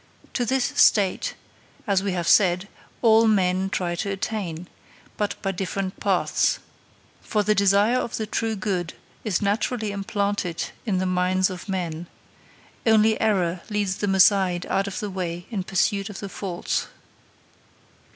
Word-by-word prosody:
To 245 - 0
this 260 +1 +1
state, 205 - +3 0.5
as 195 -3 +2
we 195 -1 -1
have 175 -2 -2
said, 185 -1 +4 0.4
all 225 0 +6
men 190 -2 +2
try 180 -3 -1
to 200 - -2
attain, 190 -4 -4 0.5
but 210 -1 -2
by 195 - 0
different 190 0 -4
paths. - - +1 0.6
For 210 -2 0
the 215 - +3
desire 200 +4 +3
of 235 - -3
the 220 - -2
true 220 +1 -1
good 185 -4 -2 0.3
is 210 -3 0
naturally 215 +2 0
implanted 200 -3 -2 0.2
in 195 -3 +1
the 185 - 0
minds 185 +1 +1
of 185 +2 -8
men; 175 -3 -3 0.8
only 220 -1 +4
error 185 -5 +1
leads 205 -3 -1
them 200 -2 0
aside 190 -2 +4
out 195 +1 +1
of 200 - -4
the 210 - -3
way 175 -2 -4
in 200 -5 -2
pursuit 195 +2 0
of 205 - -8
the 200 - -6
false. 185 -2 -3
195 Hz, 150 wpm, -24 LUFS, 185-210 Hz, 0.8 s, all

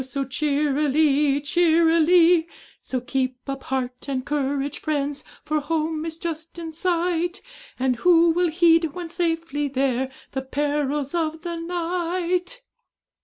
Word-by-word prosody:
so 275 +1 -3
cheerily, 290 +1 +2
cheerily; 335 +2 +4 0.3
So 260 - -3
keep 255 0 -3
up 275 -1 -5
heart 255 0 -3
and 260 -2 -2
courage, 285 0 -2
friends! 290 -2 -2 0.2
For 305 0 0
home 315 +1 -2
is 325 0 -5
just 330 0 -5
in 330 -1 -6
sight; 350 +1 0 0.4
And 255 -1 0
who 335 +3 +5
will 350 +1 +2
heed, 330 -2 +3
when 350 -2 -5
safely 330 -4 -1
there, 265 -1 0 0.2
The 265 - -3
perils 285 +1 -1
of 320 -1 -2
the 345 -1 -3
night?' 355 +5 -2
310 Hz, 125 wpm, -23 LUFS, 275-335 Hz, 0.4 s, who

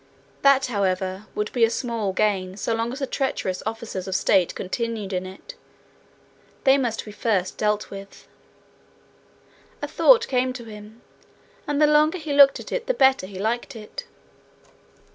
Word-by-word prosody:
That, 275 -1 +5
however, 190 -2 -2
would 210 0 -2
be 230 -2 +4
small 230 -4 -2
gain 190 -2 0
so 225 - -1
long 230 +1 -1
as 260 - -6
the 280 - -2
treacherous 255 -9 -2
officers 220 -4 -5
of 190 - -2
state 185 -2 +2
continued 215 0 -3
in 185 0 -2
it. 190 - -11 1.1
They 270 -1 +6
must 235 -4 -2
be 210 - -8
first 205 -4 -1
dealt 210 0 -1
with. 195 0 -11 1.5
A - - -4
thought 465 -2 +5
came 255 0 0
to 250 -1 -8
him, 215 0 -12 0.6
and 290 0 0
the 305 - +6
longer 300 +3 +4
he 310 -4 -4
looked 280 -1 +7
at - - -10
it - - -3
the - - +1
better 265 -8 +3
he 190 -1 -10
liked 235 +6 -2
it. 225 - -8
225 Hz, 160 wpm, -24 LUFS, 195-270 Hz, 1.5 s, looked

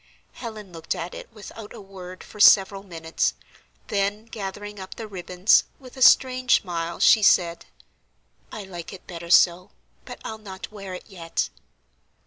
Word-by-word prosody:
Helen 215 -5 -9
looked 165 -2 -4
at 170 +2 -5
it - - -10
without 215 0 -11
a - - -9
word 185 -2 -10
for 210 - -14
several 195 -1 +6
minutes, 165 -4 -2 0.5
then 205 +1 -1
gathering 205 -1 -7
up 190 0 -8
the 225 - -7
ribbons, 185 0 +2 0.2
with 255 -2 -14
a 260 - -10
strange 255 0 +5
smile, 170 -2 -4
she 220 - +6
said: 170 -4 +3 0.8
"I 215 - -6
like 175 -1 -8
it 190 - -12
better 170 -1 -8
so; 175 0 +5 0.4
but - - -9
I'll 220 - -6
not 195 -1 -9
wear 195 -3 -7
it - - -10
yet." 165 - -3
195 Hz, 155 wpm, -24 LUFS, 175-215 Hz, 0.8 s, several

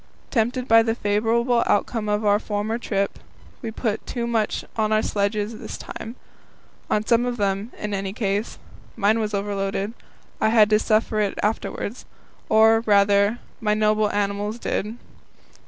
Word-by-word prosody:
Tempted 245 +1 0
by 225 0 +7
the 225 0 0
favourable 235 +3 +1
outcome 215 +1 0
of 210 +1 0
our 205 0 +4
former 215 +2 -2
trip, 200 -4 -2 0.4
we 230 - -4
put 220 -1 -2
too 240 -2 -3
much 225 -3 -1
on 215 -2 0
our 215 0 +3
sledges 210 +2 -1
this - - -7
time 225 +2 -8 0.7
on 210 0 +1
some 235 +1 +3
of 245 -1 -2
them, 200 +2 -1
in 210 -1 -4
any 195 -1 -2
case. 205 +1 -2 0.4
Mine 220 +1 +2
was 210 -1 -1
overloaded. 200 +1 -2 0.5
I 220 - +4
had 220 -2 +5
to 215 - +5
suffer 220 0 +2
for 215 - -2
it 205 -2 0
afterwards 215 +2 -2 0.4
or, 220 +1 +6
rather, 200 +1 +4 0.2
my 210 -2 +1
noble 215 0 +2
animals 205 +2 -1
did. 220 -1 -3
215 Hz, 155 wpm, -23 LUFS, 205-225 Hz, 0.7 s, by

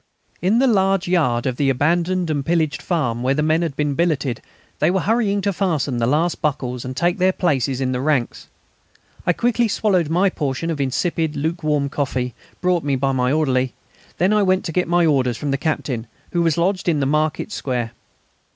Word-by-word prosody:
In 195 +6 +2
the 265 - +4
large 195 -5 +2
yard 145 -10 +1
of 130 -2 -1
the 140 -2 +2
abandoned 170 +5 +1
and 145 -2 -1
pillaged 160 -1 0
farm, 125 -10 -1
where 130 +2 +1
the 150 - 0
men 155 +2 +2
had 165 -5 -2
been 145 -1 0
billeted 145 -6 0 0.4
they 155 - +3
were 190 +1 +1
hurrying 205 -2 +1
to 200 0 0
fasten 155 -10 -1
the 115 - +1
last 160 +6 +1
buckles 125 -5 -2
and 130 0 -6
take 175 +2 +1
their 185 +1 +4
places 135 -8 0
in 130 -1 0
the 125 0 -2
ranks. 140 -4 -1 0.8
I 180 - +4
quickly 240 +3 +1
swallowed 190 -6 +1
my 180 +4 +2
portion 150 +1 -2
of 150 -3 -2
insipid 160 +3 -1
lukewarm 150 -1 0
coffee, 130 -3 -2 0.3
brought 180 -2 +1
me 140 -1 0
by 135 +1 0
my 125 -1 +1
orderly; 130 -4 +1 0.4
then 185 +5 +2
I 210 - +3
went 185 -1 +2
to 165 - -3
get 180 +2 0
my 175 0 +3
orders 130 -6 +2
from 145 -2 -3
the - - +1
Captain, 135 -7 -2 0.2
who 175 - +1
was 165 -3 +2
lodged 185 +1 +1
in 155 -3 +1
the 140 - +1
market 150 +6 0
square. 125 - -2
155 Hz, 200 wpm, -21 LUFS, 135-180 Hz, 0.8 s, the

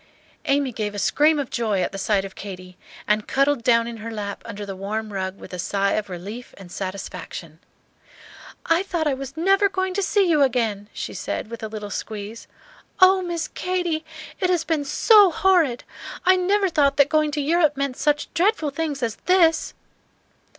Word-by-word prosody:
Amy 275 -1 +1
gave 210 -2 -4
a - - -5
scream 300 +9 +3
of 280 -3 -3
joy 220 -5 0
at - - -2
the 195 - -6
sight 195 0 +1
of 195 - -9
Katy, 185 -2 -9 0.3
and 210 0 +1
cuddled 275 -1 +2
down 230 -1 +4
in 235 -1 -6
her 225 +1 -7
lap 205 -3 -5
under 210 -2 -6
the 195 -1 -6
warm 210 +2 -4
rug 190 0 -3
with - - -12
a 180 - -5
sigh 200 +2 0
of 210 -2 -1
relief 200 +7 -8
and 185 -3 -12
satisfaction. 185 -4 -6 1.1
"I 330 +2 +3
thought 345 -4 -2
I 295 - +2
was 270 +2 -7
never 390 +4 +3
going 375 -1 -2
to 400 - -1
see 395 0 +2
you 310 -4 +3
again," 225 -6 0
she - - -6
said, 220 - -4
with 230 - -7
a 220 - -3
little 210 -1 -7
squeeze. 215 +2 -6 0.5
"Oh, 375 0 +6
Miss 345 -2 -3
Katy, 355 -3 -2 0.4
it 365 - +1
has 350 -3 +2
been 320 -3 -1
so 410 +7 +6
horrid! 330 -8 +2 0.4
I 370 +1 +6
never 385 +2 +2
thought 285 -4 +2
that 285 -1 +6
going 310 0 +2
to 295 - -1
Europe 305 0 +2
meant 275 -2 -1
such 295 +1 0
dreadful 345 -4 +1
things 290 -2 -3
as 225 -2 -2
this!" 350 -3 +3
275 Hz, 190 wpm, -23 LUFS, 210-330 Hz, 1.1 s, Oh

